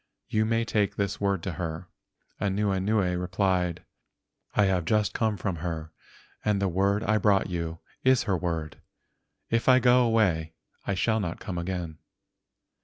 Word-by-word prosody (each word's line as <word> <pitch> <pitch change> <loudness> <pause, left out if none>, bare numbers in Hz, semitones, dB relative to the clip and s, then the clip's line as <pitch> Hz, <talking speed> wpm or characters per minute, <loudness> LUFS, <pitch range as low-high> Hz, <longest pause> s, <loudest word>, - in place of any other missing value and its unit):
You 110 0 +2
may 115 +1 +1
take 105 -3 0
this 100 -1 -2
word 100 -4 0
to 95 - -2
her." 85 +1 -5 0.5
Anuenue 100 -1 +1
replied: 90 -2 0 0.7
"I 105 - +4
have 95 -2 +1
just 105 +4 +1
come 110 -2 0
from 95 -4 -2
her 80 -1 -4 0.5
and 105 -2 +1
the 100 - +1
word 100 +4 +1
I 110 0 +2
brought 100 -2 +2
you 85 -1 -3 0.3
is 130 -1 +4
her 95 - 0
word. 80 -3 -3 0.7
If 115 +2 +2
I 130 - +8
go 125 0 +5
away 90 -9 +1 0.3
I 100 - 0
shall 110 +3 +1
not 85 -5 -3
come 90 -4 -4
again." 85 -3 -4
95 Hz, 155 wpm, -27 LUFS, 85-105 Hz, 0.7 s, I